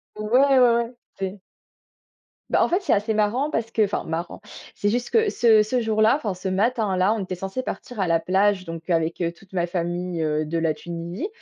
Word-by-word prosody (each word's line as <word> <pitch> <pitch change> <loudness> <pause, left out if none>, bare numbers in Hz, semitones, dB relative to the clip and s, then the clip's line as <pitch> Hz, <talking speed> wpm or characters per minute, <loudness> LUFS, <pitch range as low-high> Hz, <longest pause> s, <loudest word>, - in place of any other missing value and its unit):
Ouais, 215 0 -5
ouais, 275 -1 +5
ouais, 245 -2 +5
ouais, 235 +1 -2 0.2
c'est 195 +1 -4 1.1
bah, - - +3
en - - +2
fait, 360 +4 +1
c'est 345 - +1
assez 210 +2 +1
marrant 230 +8 +1
parce 225 -4 -2
que 225 -1 +2
enfin, 205 - -1
marrant, 165 +4 -5 0.3
c'est 205 - -1
juste 240 +2 -2
que 445 -2 +3
ce 225 - +4
ce 240 +4 0
jour-là 220 +1 +3
enfin, 220 -9 -3
ce 185 +1 -6
matin-là, 205 -1 +1
on 225 - -3
était 185 -1 -5
censés 195 +7 -4
partir 245 -3 -7
à 190 - +1
la 165 -1 +3
plage, 190 +2 +1
donc 165 0 -8
avec, 165 0 0
heu, 170 -1 0
toute 190 +3 -21
ma 175 -2 0
famille, 175 0 -3
heu, 155 0 0
de 160 +2 -2
la 165 -1 +1
Tunisie. 170 - -5
200 Hz, 215 wpm, -23 LUFS, 175-230 Hz, 1.1 s, ouais